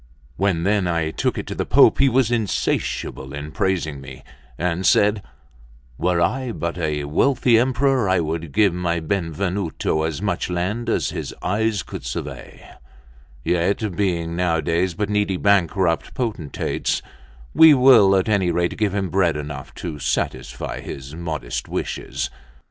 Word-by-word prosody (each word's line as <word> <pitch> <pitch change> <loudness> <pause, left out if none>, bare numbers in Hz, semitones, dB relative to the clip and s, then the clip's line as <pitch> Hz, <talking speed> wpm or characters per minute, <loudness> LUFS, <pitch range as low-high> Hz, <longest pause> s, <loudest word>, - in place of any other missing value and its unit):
When 90 0 0
then 100 -1 +1
I 85 -2 0
took - - -1
it - - -4
to - - -5
the - - -2
Pope, - - +5
he 135 0 +5
was 125 -1 +2
insatiable 100 - -2
in 75 +1 -6
praising 90 -8 -1
me, 65 -1 -11 0.3
and 90 +1 -1
said: 105 +1 +3 0.8
"Were 90 -1 +1
I 125 +9 0
but 85 -4 -3
a 75 -3 -1
wealthy 120 - +3
emperor, 130 -2 +2
I 95 -1 +3
would 80 -1 -3
give 100 -1 +3
my 85 -1 -1
Benvenuto 85 -1 -2
as 80 -1 -2
much 95 -3 -2
land 100 +7 -2
as - - 0
his - - -5
eyes 105 +1 0
could - - -8
survey; - - -7 0.8
yet 95 +3 0
being 85 -4 -1
nowadays 85 0 0
but 105 +3 -1
needy 105 -2 0
bankrupt 95 -3 +1
potentates, 105 - -2 0.5
we 160 -2 +8
will 120 -7 +6
at 95 - +1
any 100 -4 +2
rate 85 0 0
give 105 -3 0
him 95 -2 -2
bread 90 -5 +2
enough 75 -2 -7
to 80 -4 -6
satisfy 65 -2 -3
his 70 +1 -8
modest 80 -7 -4
wishes." - - -3
90 Hz, 150 wpm, -22 LUFS, 80-105 Hz, 0.8 s, we